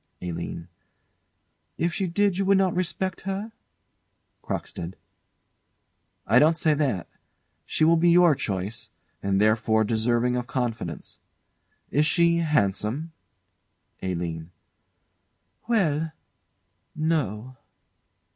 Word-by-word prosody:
ALINE. 85 -1 -5 1.1
If 170 0 0
she 190 - -1
did 195 +2 +1
you 195 - +1
would 195 0 +4
not 190 -2 +2
respect 185 +1 -2
her? 195 +3 -4 0.9
CROCKSTEAD. 85 +2 -5 1.3
I 115 +5 +5
don't 160 +3 +4
say 155 -2 +3
that. 135 - -1 0.6
She - - 0
will 165 +1 +5
be 170 +1 +4
your 175 -1 +6
choice; 100 -4 -3 0.3
and 100 0 +1
therefore 110 +1 +3
deserving 120 +2 +1
of 125 0 -3
confidence. 115 - -4 0.7
Is 150 +1 +3
she 170 -1 +3
handsome? 150 - 0 0.9
ALINE. 85 -3 -3 1.2
Well 160 -9 +1 0.8
no. 130 - -1
140 Hz, 100 wpm, -25 LUFS, 105-170 Hz, 1.3 s, your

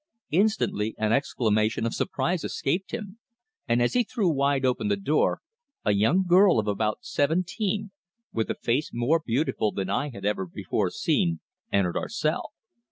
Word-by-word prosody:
Instantly 165 - +1
an 110 0 +1
exclamation 110 -4 +1
of 115 - -1
surprise 145 +6 -1
escaped 175 +8 -2
him, 215 -2 -6 0.5
and 120 +1 +3
as 120 - +1
he 250 - +3
threw 220 -5 0
wide 140 -2 +1
open 125 -4 +1
the 100 -1 +1
door, 145 +10 +1 0.4
a - - +4
young 115 - +3
girl 180 - +5
of 110 -1 0
about 105 +1 -1
seventeen, 185 +7 -1 0.4
with 110 -1 -1
a - - -1
face 130 +6 0
more 130 +8 +1
beautiful 115 -4 0
than 95 -1 -3
I 140 +8 0
had 100 -6 -8
ever 100 -3 0
before - - -2
seen, 85 -1 0 0.3
entered 95 -3 +1
our - - -3
cell. 180 0 -2
130 Hz, 165 wpm, -26 LUFS, 105-180 Hz, 0.5 s, girl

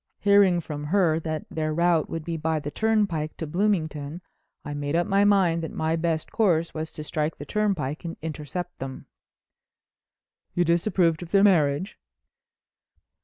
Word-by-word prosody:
Hearing 200 -4 +4
from 150 -2 -6
her 165 -1 +2
that 155 -2 -4
their 155 -1 -2
route 170 -2 +2
would 165 -1 -5
be 170 - -3
by 160 0 -1
the 145 0 -5
turnpike 205 -9 0
to 160 - -4
Bloomington 160 -4 -1 0.5
I 145 - -4
made 145 +1 -2
up 175 +1 +2
my 195 +1 +3
mind 190 -5 +3
that 160 - -4
my 160 +1 0
best 165 -1 -1
course 170 -7 +2
was 155 0 -4
to 155 - -6
strike 150 +1 -2
the 145 - -8
turnpike 170 -7 -1
and 165 -1 -6
intercept 160 +3 -5
them." 130 0 -7 1.5
"You 175 - +2
disapproved 170 -1 +2
of 175 - -7
their 195 +2 +4
marriage?" 170 -1 +2
165 Hz, 160 wpm, -25 LUFS, 155-180 Hz, 1.5 s, Hearing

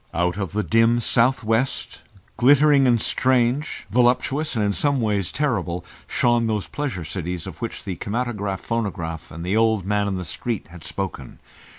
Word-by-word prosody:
Out 90 +1 +1
of 95 -4 -4
the 105 +1 0
dim 115 +6 +3
south 120 +1 +2
west, 115 +4 -1 0.3
glittering 140 +1 +5
and 120 -2 +4
strange, 130 +5 +1
voluptuous, 125 +5 +2
and 110 -2 +1
in 100 - +1
some 140 - +1
way 105 -3 +1
terrible, 90 - -2 0.2
shone 120 -1 +2
those 105 -3 -1
Pleasure 125 - -4
Cities 85 +1 -4
of 90 -4 -9
which 115 - -5
the 95 -4 -4
kinematograph 105 -3 -3
phonograph 85 -8 -3
and 85 +2 -7
the 95 +3 0
old 110 -4 +2
man 105 0 +1
in 100 - -1
the 90 - -4
street 100 - -4
had 85 -1 -12
spoken. 95 -10 -5
110 Hz, 170 wpm, -23 LUFS, 90-120 Hz, 0.3 s, glittering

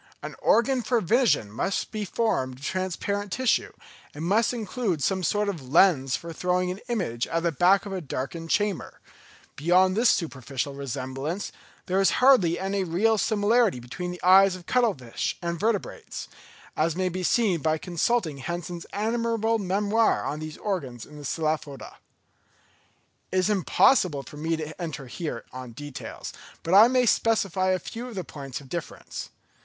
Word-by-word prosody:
An - - -6
organ 250 +2 +3
for 240 0 +1
vision 220 - +2
must 185 - -2
be 215 -1 -3
formed 130 - -1
of 140 - -9
transparent 190 +3 -2
tissue, 255 +2 +1 0.4
and 155 +3 -4
must 215 +6 +3
include 215 - -2
some 190 +7 +1
sort 205 +4 +1
of 160 -10 -5
lens 140 -5 +4
for 170 0 -7
throwing 180 +2 0
an 185 - -6
image 175 - -2
at 165 0 -1
the 170 - +2
back 180 +6 +4
of 200 - -5
a 185 - -3
darkened 160 +3 -5
chamber. 205 -1 -1 0.6
Beyond 185 +5 +3
this 230 +2 +4
superficial 140 -4 -1
resemblance, 135 +5 -4 0.3
there 190 +1 +1
is 195 - +4
hardly 245 -11 +5
any 195 +1 -1
real 205 +6 +2
similarity 215 - +2
between 125 +9 -6
the 180 0 -6
eyes 190 +1 +6
of 180 -2 -11
cuttle 240 -5 +2
fish 125 -4 -4
and 170 -1 -3
vertebrates, 215 -1 -2 0.5
as 160 +1 +1
may 185 0 0
be 185 +1 -3
seen 185 -3 +2
by 155 +1 +1
consulting 175 -1 0
Hensen's 170 +3 -5
admirable 225 +1 0
memoir 205 +3 +1
on 150 - -3
these 155 0 -7
organs 135 - -4
in 150 - -13
the 145 - -9
Cephalopoda. 155 -2 -3 1.3
It 185 - 0
is 185 +3 +2
impossible 185 - +3
for 150 - -12
me 160 +2 -1
here 155 - -4
to - - -13
enter 150 -4 -5
on 130 -2 -8
details, 145 +2 -8 0.3
but 165 - -1
I 210 +4 +9
may 250 0 +3
specify 195 -5 +2
a 185 - +3
few 235 +6 -7
of 240 - -9
the 185 - -3
points 140 -4 -7
of 140 - -14
difference. 170 +2 -6
180 Hz, 165 wpm, -26 LUFS, 150-210 Hz, 1.3 s, I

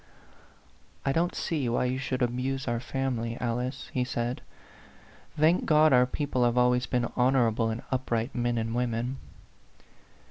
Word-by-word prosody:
"I 135 - +2
don't 170 +4 0
see 145 -7 -1
why 120 - +1
you 130 +1 -1
should 130 -2 -1
abuse 130 +2 -2
our 120 -1 0
family, 120 -2 -2
Alice," 125 +2 -3
he 125 - +1
said. 120 0 -3 1.0
"Thank 160 +4 +3
God, 155 -1 +5
our 125 0 +5
people 135 -2 -1
have 120 0 +2
always 125 0 +3
been 120 0 0
honorable 125 -3 +2
and 110 +2 -4
up 130 0 -2
right 115 +2 -1
men 120 -1 0
and 115 0 -2
women 120 +1 -1
125 Hz, 150 wpm, -28 LUFS, 120-135 Hz, 1.0 s, God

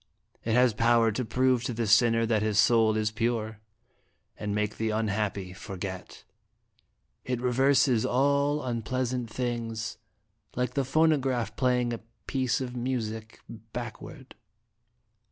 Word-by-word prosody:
It 115 - -1
has 125 -1 +4
power 115 +1 +3
to 115 +5 -2
prove 125 +1 +1
to 125 - -3
the 115 0 -1
sinner 115 +2 +4
that 110 -2 +1
his 105 -1 0
soul 110 0 +4
is 110 0 0
pure, 110 -1 -2 0.8
and 105 -1 -3
make 105 0 -1
the 110 0 -1
unhappy 105 -3 -2
forget; 95 0 -7 1.0
it 125 -1 -2
reverses 130 -1 +3
all 140 +3 +2
unpleasant 125 0 -2
things, 115 -2 -3 0.6
like 125 0 -1
the 140 -1 0
pho 145 +5 +1
nograph 130 -8 0
playing 125 -2 +1
a 115 - -4 0.3
piece 130 -3 0
of 125 -1 -5
music 115 -3 -4 0.3
backward." 125 +3 -8
120 Hz, 130 wpm, -28 LUFS, 110-125 Hz, 1.0 s, has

